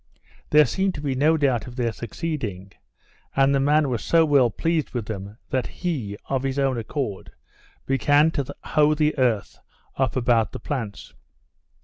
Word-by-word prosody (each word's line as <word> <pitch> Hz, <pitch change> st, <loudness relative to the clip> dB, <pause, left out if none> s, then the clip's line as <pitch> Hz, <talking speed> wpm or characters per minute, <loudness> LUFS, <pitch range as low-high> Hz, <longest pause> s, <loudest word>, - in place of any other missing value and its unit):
There 150 Hz, 0 st, +6 dB
seemed 190 Hz, +9 st, -1 dB
to 145 Hz, -, -6 dB
be 140 Hz, -2 st, -1 dB
no 150 Hz, +5 st, +3 dB
doubt 130 Hz, -6 st, +1 dB
of 120 Hz, -, -9 dB
their 120 Hz, -3 st, 0 dB
succeeding; 110 Hz, -, -5 dB, 0.6 s
and 135 Hz, 0 st, +4 dB
the 135 Hz, -, +2 dB
man 145 Hz, +2 st, +3 dB
was 120 Hz, -4 st, -2 dB
so 165 Hz, -1 st, +4 dB
well 140 Hz, -5 st, +4 dB
pleased 160 Hz, +5 st, -1 dB
with 120 Hz, -3 st, -2 dB
them, 100 Hz, 0 st, -7 dB
that 130 Hz, -1 st, 0 dB
he, 130 Hz, -, -4 dB
of 135 Hz, -1 st, 0 dB
his 135 Hz, 0 st, -2 dB
own 135 Hz, -3 st, +1 dB
accord, 115 Hz, -4 st, -4 dB, 0.5 s
began 145 Hz, +5 st, +3 dB
to 140 Hz, -4 st, -2 dB, 0.2 s
hoe 150 Hz, 0 st, +3 dB
the 150 Hz, 0 st, +1 dB
earth 120 Hz, -6 st, 0 dB, 0.4 s
up 135 Hz, -1 st, 0 dB
about 120 Hz, -4 st, +2 dB
the -, -, -6 dB
plants. 115 Hz, -9 st, -5 dB
135 Hz, 165 wpm, -24 LUFS, 115-150 Hz, 0.6 s, There